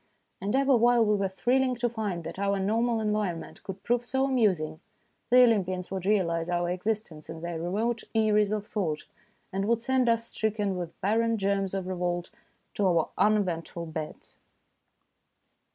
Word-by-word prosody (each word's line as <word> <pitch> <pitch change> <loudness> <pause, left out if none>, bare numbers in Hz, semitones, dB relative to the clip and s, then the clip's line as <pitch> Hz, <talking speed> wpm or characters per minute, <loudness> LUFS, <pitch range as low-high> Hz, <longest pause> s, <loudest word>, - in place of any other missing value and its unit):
And 205 +5 -1
ever 275 0 +4
while 240 0 +4
we 210 0 +3
were 195 -1 0
thrilling 250 +6 +1
to 240 0 0
find 210 -7 -3
that 185 - -7
our 200 0 +1
normal 225 +4 +1
environment 210 -5 -2
could 195 0 -8
prove 240 0 +1
so 265 +2 0
amusing, 185 - +1 0.5
the 250 +1 +7
Olympians 185 -6 +1
would 190 -1 -3
realise 170 -5 +1
our 175 0 0
existence 180 -4 -3
in 160 0 -7
their 170 -1 -4
remote 220 +7 -1
eyries 210 -2 +3
of 210 -1 -2
thought, 175 -9 -2 0.5
and 195 +1 -1
would 230 0 +1
send 260 -1 +2
us, 230 0 +1
stricken 210 -4 -1
with 175 -2 -6
barren 225 +3 +2
germs 195 -1 0
of 190 -1 -2
revolt, 175 -1 -2 0.4
to 200 - +1
our 170 -3 +2
uneventful 185 -5 0
beds. 160 -1 -7
200 Hz, 160 wpm, -28 LUFS, 180-230 Hz, 0.5 s, the